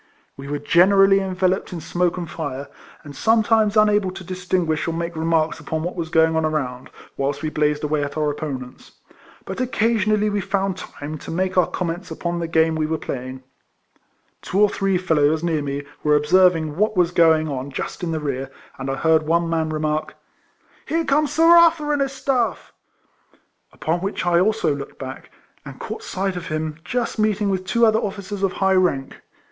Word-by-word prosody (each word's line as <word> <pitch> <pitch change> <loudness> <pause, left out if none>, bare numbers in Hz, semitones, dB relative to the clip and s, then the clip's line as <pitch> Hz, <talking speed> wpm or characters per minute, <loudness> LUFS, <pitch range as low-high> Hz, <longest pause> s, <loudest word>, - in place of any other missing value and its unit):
We 135 0 -9
were 145 +1 -2
generally 195 +6 +5
enveloped 190 -1 -1
in 175 - -5
smoke 175 +2 -1
and 175 -2 -4
fire, 145 -4 -5 0.3
and 145 -1 -10
sometimes 220 - +2
unable 210 -2 +4
to 185 +1 -8
distinguish 180 -3 -1
or 165 - -1
make 170 0 -4
remarks 160 0 0
upon 160 +1 -4
what 175 - -4
was 165 -3 -4
going 160 0 +3
on 160 - +1
around, 135 -5 -2 0.3
whilst 140 +2 -2
we 155 - -2
blazed 150 0 0
away 150 -1 0
at 145 +1 -5
our 150 -1 +1
opponents; 135 -4 -7 0.5
but - - -5
occasionally 215 -4 +1
we 205 -1 -1
found 195 -1 -1
time 155 -4 -8
to - - -10
make 185 +2 -1
our 180 - +4
comments 180 +1 -4
upon 170 +1 -3
the 170 - -2
game 160 0 +2
we 155 -1 -1
were 160 0 -1
playing. 130 -2 -6 1.0
Two 190 - -2
or 210 0 +5
three 195 -2 0
fellows 160 -3 +1
near 165 -3 0
me 140 0 -4 0.2
were 150 0 +4
observing 160 0 +3
what 210 0 +1
was 175 -1 +3
going 160 -2 +4
on 135 -1 -4
just 140 - -5
in 175 - -2
the 160 - -1
rear, 135 -3 -3 0.3
and 130 +1 -4
I 135 - -1
heard 160 +2 +2
one 170 +1 +2
man 160 -1 0
remark, 155 0 -2 0.4
" - - -34
Here 330 +1 0
comes 295 +1 +2
Sir 315 +2 +2
Arthur 335 -3 +5
and 290 - 0
his 275 -1 0
staff; 265 -3 -1 0.5
" - - -38
upon 165 +2 -2
which 195 +1 -3
I 175 -1 +3
also 200 -6 +1
looked 140 -1 -8
back, 130 -1 -8 0.3
and - - -10
caught - - -6
sight 190 0 -3
of 175 -2 -6
him 155 -1 -3
just 235 +4 -2
meeting 210 -1 +1
with 185 -1 -3
two 235 +4 +3
other 220 0 +3
officers 200 -1 -5
of 195 -2 +1
high 190 0 +2
rank. 175 -8 0
170 Hz, 195 wpm, -21 LUFS, 155-195 Hz, 1.0 s, generally